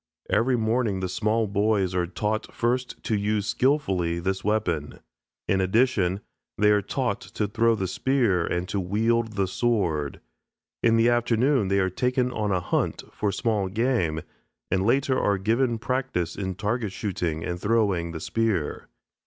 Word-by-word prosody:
Every 125 +2 +3
morning 110 -3 0
the 95 - -2
small 110 +4 0
boys 100 -2 +1
are 90 -1 0
taught 105 +4 -2
first 125 +2 -2
to 110 - 0
use 105 0 0
skilfully 100 - +1
this 95 +3 -2
weapon. 90 -8 -1 0.5
In 95 -1 +2
addition 95 -2 +2 0.4
they 105 +1 +4
are 105 0 +4
taught 125 +5 -2
to 105 - -3
throw 115 +2 +2
the 95 -3 -2
spear 115 -5 +1
and 90 +2 -2
to 100 - -1
wield 110 +4 0
the 100 -2 +1
sword. 95 - 0 0.6
In 115 -1 +4
the 115 +1 +4
afternoon 120 0 +2
they 100 +1 +1
are 95 -1 +1
taken 125 +3 0
on 105 -4 -1
a 90 - +2
hunt 85 - -1
for 105 -1 -1
small 105 -3 0
game, 95 -7 0 0.5
and 95 +2 +1
later 130 +1 +2
are 100 -1 +2
given 115 +5 +1
practice 120 -8 -2
in 95 -2 -3
target 105 +1 -2
shooting 90 -6 -3
and 90 0 -4
throwing 100 -6 +1
the 80 - -6
spear. 110 -6 -1
105 Hz, 160 wpm, -25 LUFS, 95-115 Hz, 0.6 s, they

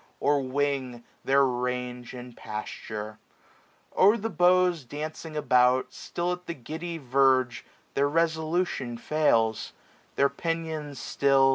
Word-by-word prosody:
Or 145 0 +2
wing, 130 -2 -2 0.2
their 135 +1 +4
range 125 0 -3
and 125 -1 -9
pasture. 105 0 -6 0.8
O'er 205 +4 +6
the 225 +1 -3
bought 180 -5 +3
Dancing 155 +1 -6
about, 125 -2 +3
still 175 +1 -3
at 180 0 -5
the 170 - -4
giddy 160 +6 -6
verge 130 -2 +2 0.3
Their 140 +1 +2
resolution 160 -5 0
fails; 115 -6 +1 0.4
their 140 - +4
pinions 160 -3 -4
still. 135 +1 +3
140 Hz, 115 wpm, -27 LUFS, 125-160 Hz, 0.8 s, O'er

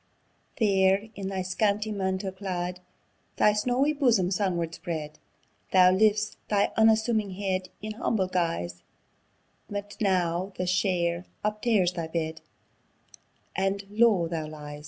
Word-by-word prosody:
There, 195 -1 +3
in 195 -2 -5
thy 190 -1 -2
scanty 205 +3 0
mantle 190 -1 -2
clad, 180 -2 -4 0.6
Thy 210 - +4
snawie 250 +7 +1
bosom 235 - +2
sun 190 -2 +1
ward 165 -1 -2
spread, 155 -3 -5 0.5
Thou 185 -1 +7
lifts 210 +2 +2
thy 205 -1 +2
unassuming 220 -2 +3
head 185 -2 -2
In 215 - -4
humble 215 -3 0
guise; 165 - -2 0.9
But 205 0 -6
now 185 -1 +1
the 185 - -1
share 180 -1 0 0.2
uptears 210 -4 +1
thy 170 -2 -4
bed, 160 -1 -3 1.1
And 195 +1 -1
low 210 -6 +4
thou 165 -2 -3
lies! 150 -1 -8
190 Hz, 125 wpm, -27 LUFS, 175-210 Hz, 1.1 s, Thou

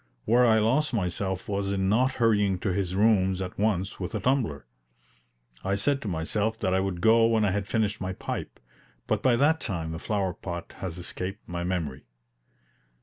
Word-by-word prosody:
Where 120 +2 +5
I 110 -1 +5
lost 125 +6 +2
myself 95 +1 -2
was 100 -1 -1
in 95 -1 0
not 125 +6 +3
hurrying 105 -6 +2
to 95 - 0
his 95 -1 -1
rooms 95 -3 +3
at 95 0 -5
once 100 -3 0
with 95 +4 -4
a - - 0
tumbler. 110 - 0 1.0
I 95 +1 0
said 135 +8 0
to 110 - -5
myself 100 +6 -1
that 95 -4 0
I 95 - +3
would 95 -2 -2
go 115 0 +5
when 110 -2 +2
I 100 - +2
had 100 0 -2
finished 105 -2 0
my 95 0 -2
pipe, - - -5 0.5
but 110 -1 0
by 125 0 +4
that 150 +6 +3
time 85 -6 -3
the 80 - -5
flower 95 -2 -1
pot 85 -1 -7
has 90 -3 -5
escaped 90 +3 -5
my 85 0 -4
memory. 80 -7 -3
100 Hz, 190 wpm, -27 LUFS, 90-110 Hz, 1.0 s, Where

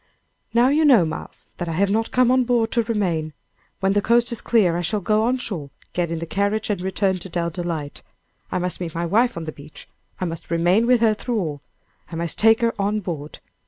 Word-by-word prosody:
"Now 240 +2 +4
you 300 +3 +3
know, 250 - +6
Miles, 155 - -7
that 175 -1 -4
I - - -2
have 195 +4 +1
not 225 +2 0
come 250 -1 +3
on 255 0 +4
board 235 -2 +1
to 235 - +2
remain. 180 -9 -1 0.5
When 195 0 +2
the 205 - +2
coast 235 +3 +3
is 235 - -4
clear 200 -8 +3
I 175 - -1
shall 195 +5 0
go 215 +3 +1
on 250 +2 +1
shore, 175 - -5 0.2
get 175 -2 -1
in 165 - -2
the 165 - -4
carriage, 205 +4 -1
and 195 -3 -2
return 190 0 0
to 190 - -9
Dell 170 0 -2
Delight. 165 -4 -4 0.5
I - - 0
must 180 0 -3
meet 165 -2 -5
my 170 +1 -1
wife 230 +6 +2
on 165 - -4
the 155 - -5
beach. 150 0 -13 0.3
I 185 - -1
must 165 -1 -6
remain 175 +7 +2
with 250 -2 +4
her 225 -2 +4
through 230 +1 -2
all. 150 -6 -4 0.5
I - - -5
must 170 -1 -2
take 225 +1 +5
her 230 0 +2
on 210 +2 0
board. 155 -5 -6
195 Hz, 230 wpm, -22 LUFS, 170-230 Hz, 0.5 s, know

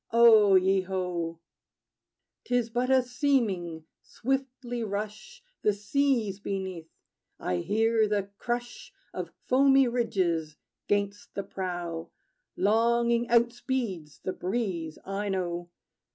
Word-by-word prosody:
O 220 -4 +7
ye 190 +1 +4
ho! 180 -3 -3 1.1
'T 245 - 0
is 240 -2 +1
but 245 +2 0
a 260 -1 +5
seeming: 230 - 0 0.2
swiftly 255 -2 -3
rush 210 - -5 0.2
The 210 - +3
seas, 215 -1 0
beneath. 190 -5 -4 0.5
I 90 - -1
hear 220 - +2
the 200 -1 -1
crush 240 0 -4 0.2
Of - - -4 0.2
foamy 270 0 +5
ridges 185 -10 0 0.3
'gainst 205 0 -1
the 200 - -2
prow. 175 -4 -4 0.5
Longing 235 +2 +3
outspeeds 235 - 0
the 185 - -2
breeze, 180 -6 -3
I 200 +1 -3
know. 175 -2 -2
205 Hz, 110 wpm, -28 LUFS, 185-240 Hz, 1.1 s, O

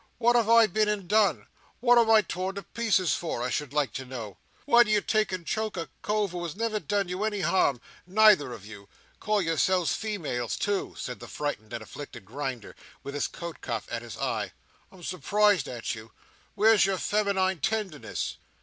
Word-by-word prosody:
What 240 0 +3
have 230 -2 +3
I 230 0 +8
been 215 +1 +1
and 205 -4 -2
done? 210 -1 +3 0.3
What 245 0 +5
am 230 -1 +3
I 220 -1 +7
to - - -16
be - - -26
tore 185 +2 -3
to 200 0 -6
pieces 200 -3 +1
for, 160 -8 -3
I 125 - -2
should 150 -3 -2
like 150 -2 0
to 135 - -4
know? 120 -6 -7 0.3
Why 240 -4 +6
do 235 - +3
you 210 -1 +4
take 215 0 0
and 185 -2 -4
choke 215 0 -2
a 165 - -4
cove 210 -2 0
who 175 -1 -5
has 170 -3 -5
never 220 0 -1
done 205 -2 -1
you 180 +3 -3
any 210 -2 -1
harm, 140 -10 +2 0.3
neither 200 -8 +5
of 105 -4 -9
you? 100 -2 -12 0.3
Call 210 -2 +1
yourselves 170 +2 +2
females, 160 - -3
too!" 205 -1 -1
said 125 - -5
the - - -9
frightened 145 -8 -4
and 120 -2 -5
afflicted 120 -3 -10
Grinder, 130 0 -5 0.3
with 140 - -6
his 145 - -1
coat 170 -1 -8
cuff 115 -3 -4
at 115 - -3
his 120 -4 -9
eye. - - -2 0.4
"I'm 185 -2 -15
surprised 195 0 +2
at 120 +1 -4
you! 110 -1 -10 0.4
Where's 215 0 +5
your 195 0 +1
feminine 190 -3 +1
tenderness?" 195 -3 -2
185 Hz, 205 wpm, -27 LUFS, 140-215 Hz, 0.4 s, I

